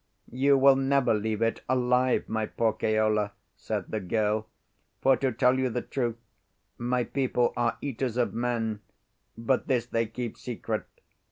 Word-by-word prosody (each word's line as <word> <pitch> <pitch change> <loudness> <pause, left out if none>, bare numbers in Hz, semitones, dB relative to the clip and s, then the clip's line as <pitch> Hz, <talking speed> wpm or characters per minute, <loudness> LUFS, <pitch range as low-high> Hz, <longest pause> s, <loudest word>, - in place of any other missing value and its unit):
"You 135 +3 +3
will 135 0 +6
never 135 -2 +2
leave 110 +1 -1
it 115 - 0
alive, 125 0 +2
my 110 -1 -1
poor 115 -2 0
Keola," 110 -1 +1 0.2
said - - -4
the 110 - -1
girl; 105 +2 0 0.5
"for 135 0 +4
to 135 -1 0
tell 125 +2 +3
you 130 -1 +1
the 125 +1 -3
truth, 120 -4 -2 0.6
my 125 +1 0
people 125 -1 0
are 120 -1 0
eaters 130 -3 -3
of 120 - +1
men; 115 -2 -1 0.6
but 115 +3 0
this 125 -4 +1
they 115 -1 -1
keep 120 0 -6
secret. 115 -2 -4
120 Hz, 155 wpm, -28 LUFS, 110-130 Hz, 0.6 s, will